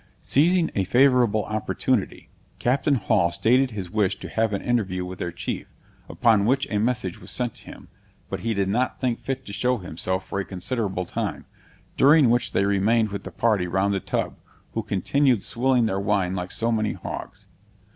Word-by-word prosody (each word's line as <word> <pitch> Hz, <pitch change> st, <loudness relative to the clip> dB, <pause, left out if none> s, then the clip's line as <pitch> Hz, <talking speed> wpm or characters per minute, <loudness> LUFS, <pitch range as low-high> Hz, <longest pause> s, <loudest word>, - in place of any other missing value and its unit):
Seizing 170 Hz, +4 st, +2 dB
a 95 Hz, -, +1 dB
favorable 120 Hz, -1 st, +3 dB
opportunity, 110 Hz, -1 st, -2 dB, 0.3 s
Captain 140 Hz, +3 st, +1 dB
Hall 90 Hz, -6 st, +2 dB
stated 125 Hz, +9 st, +3 dB
his 100 Hz, -6 st, -6 dB
wish 100 Hz, -2 st, +1 dB
to -, -, -8 dB
have 110 Hz, -1 st, 0 dB
an 100 Hz, -, -3 dB
interview 95 Hz, -7 st, 0 dB
with 90 Hz, 0 st, -8 dB
their 85 Hz, -, -3 dB
chief, 85 Hz, -, -5 dB, 0.4 s
upon 110 Hz, -5 st, +3 dB
which 135 Hz, +3 st, +2 dB
a 105 Hz, -, +1 dB
message 110 Hz, -5 st, -1 dB
was 90 Hz, -, -10 dB
sent 120 Hz, +3 st, -2 dB
to -, -, -16 dB
him; -, -, -12 dB, 0.4 s
but -, -, -4 dB
he 115 Hz, -1 st, -2 dB
did 100 Hz, -1 st, 0 dB
not 120 Hz, +6 st, 0 dB
think 125 Hz, -3 st, -1 dB
fit 135 Hz, -1 st, -4 dB
to 100 Hz, -, -8 dB
show 125 Hz, +3 st, +1 dB
himself 95 Hz, 0 st, -3 dB
for 100 Hz, -, -3 dB
a -, -, -1 dB
considerable 95 Hz, 0 st, -3 dB
time, -, -, -4 dB, 0.5 s
during 140 Hz, -3 st, +6 dB
which 120 Hz, -1 st, +1 dB
they 100 Hz, -, +1 dB
remained 105 Hz, +3 st, +2 dB
with 100 Hz, -1 st, -5 dB
the -, -, -6 dB
party 105 Hz, -6 st, +1 dB
round 95 Hz, +3 st, +1 dB
the 100 Hz, -, 0 dB
tub, -, -, -3 dB, 0.4 s
who 115 Hz, -, -1 dB
continued 110 Hz, +4 st, +1 dB
swilling 125 Hz, 0 st, +1 dB
their 95 Hz, -3 st, -1 dB
wine 100 Hz, -3 st, 0 dB
like 90 Hz, -1 st, -4 dB
so 115 Hz, +1 st, 0 dB
many 110 Hz, -2 st, 0 dB
hogs. -, -, -8 dB
110 Hz, 185 wpm, -24 LUFS, 95-125 Hz, 0.5 s, during